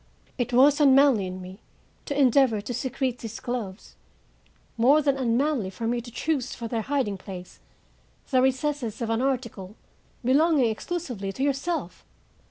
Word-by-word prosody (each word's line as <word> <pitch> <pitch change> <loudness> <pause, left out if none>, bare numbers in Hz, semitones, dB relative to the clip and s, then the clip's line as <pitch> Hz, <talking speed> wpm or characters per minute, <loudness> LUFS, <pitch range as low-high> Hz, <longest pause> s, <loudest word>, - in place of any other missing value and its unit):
It 245 0 -1
was 280 +4 +5
unmanly 270 -7 +5
in 185 0 -6
me 185 +2 -10 0.5
to 285 0 -2
endeavor 260 -4 +4
to 210 +4 -5
secrete 255 0 -2
these 225 -1 -7
gloves; 225 -5 -5 0.8
more 260 +6 +5
than 280 -2 +1
unmanly 255 -3 0
for 225 +4 -6
me 240 +1 0
to 240 - -11
choose 260 +1 -2
for 235 - -5
their 225 0 -2
hiding 235 -6 -1
place 180 -1 -10 0.7
the 255 -1 +4
recesses 265 -3 -1
of 225 - -2
an 225 +1 0
article 235 -7 -3 0.5
belonging 275 -2 +3
exclusively 245 - -4
to 265 - -3
yourself. 285 +5 -2
250 Hz, 150 wpm, -26 LUFS, 225-275 Hz, 0.8 s, was